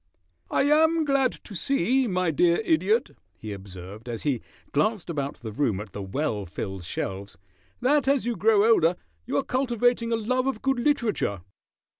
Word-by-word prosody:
"I -, -, +2 dB
am 315 Hz, +2 st, +4 dB
glad 275 Hz, -3 st, +2 dB
to 210 Hz, -, -10 dB
see, 260 Hz, +5 st, +1 dB
my 185 Hz, -4 st, +1 dB
dear 170 Hz, +2 st, +3 dB
Idiot," 420 Hz, +8 st, +2 dB, 0.3 s
he 110 Hz, -1 st, -6 dB
observed, 100 Hz, +3 st, -10 dB
as 115 Hz, -2 st, -5 dB
he 135 Hz, -6 st, 0 dB, 0.3 s
glanced 175 Hz, +4 st, 0 dB
about 140 Hz, -3 st, -3 dB
the 110 Hz, -2 st, -8 dB
room 110 Hz, -4 st, 0 dB
at 105 Hz, -2 st, -8 dB
the 100 Hz, -, -5 dB
well 105 Hz, -, -2 dB
filled 95 Hz, +2 st, -5 dB
shelves, 95 Hz, +3 st, -5 dB, 0.4 s
"that 280 Hz, +2 st, +3 dB
as 275 Hz, -3 st, +2 dB
you 240 Hz, -1 st, -1 dB
grow 210 Hz, +2 st, +4 dB
older 180 Hz, -7 st, +4 dB, 0.3 s
you 145 Hz, -, 0 dB
are -, -, +1 dB
cultivating 245 Hz, -2 st, +1 dB
a -, -, +3 dB
love 255 Hz, +4 st, 0 dB
of 265 Hz, -5 st, -2 dB
good 270 Hz, -2 st, +1 dB
literature." 235 Hz, -, 0 dB
195 Hz, 170 wpm, -26 LUFS, -, 0.4 s, am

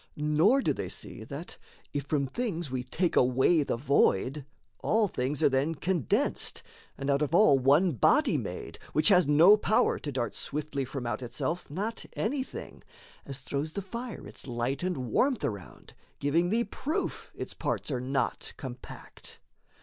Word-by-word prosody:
Nor 155 Hz, -, +3 dB
do -, -, +2 dB
they -, -, -5 dB
see, -, -, -7 dB
That, -, -, -8 dB, 0.3 s
if 145 Hz, -1 st, -2 dB
from 140 Hz, -2 st, +1 dB
things 170 Hz, -, -3 dB
we 130 Hz, -1 st, -1 dB
take 170 Hz, +7 st, -1 dB
away 130 Hz, +6 st, +4 dB
the 140 Hz, -, -1 dB
void, 135 Hz, +1 st, +2 dB, 0.3 s
All 220 Hz, -1 st, +2 dB
things 135 Hz, -3 st, -2 dB
are -, -, +7 dB
then 140 Hz, +5 st, +1 dB
condensed, 175 Hz, -, 0 dB, 0.3 s
and 135 Hz, -, -4 dB
out 140 Hz, +1 st, +2 dB
of 150 Hz, +2 st, +1 dB
all 150 Hz, -9 st, +6 dB
One 145 Hz, +8 st, +4 dB
body 120 Hz, -, +3 dB
made, -, -, -5 dB
which 155 Hz, +6 st, +4 dB
has 180 Hz, -6 st, +5 dB
no 165 Hz, +8 st, +7 dB
power 215 Hz, 0 st, +2 dB
to 145 Hz, -, -5 dB
dart 125 Hz, -3 st, -2 dB
Swiftly 140 Hz, -2 st, -3 dB
from 130 Hz, -1 st, -5 dB
out 120 Hz, 0 st, -2 dB
itself 160 Hz, +7 st, -3 dB
not 205 Hz, +9 st, -3 dB
anything 260 Hz, +5 st, -4 dB, 0.5 s
As 135 Hz, -1 st, -5 dB
throws 145 Hz, +4 st, -3 dB
the 200 Hz, -, -4 dB
fire 235 Hz, +4 st, -6 dB
its -, -, -9 dB
light 125 Hz, +3 st, -2 dB
and 180 Hz, -2 st, -1 dB
warmth 200 Hz, -, +1 dB
around, 100 Hz, -4 st, -6 dB, 0.2 s
Giving 165 Hz, +5 st, +1 dB
thee 230 Hz, +4 st, +2 dB
proof 300 Hz, +6 st, -3 dB
its -, -, -6 dB
parts -, -, -2 dB
are 125 Hz, -2 st, -1 dB
not 130 Hz, -1 st, -2 dB
compact. 130 Hz, -2 st, -10 dB
150 Hz, 165 wpm, -29 LUFS, 130-185 Hz, 0.5 s, are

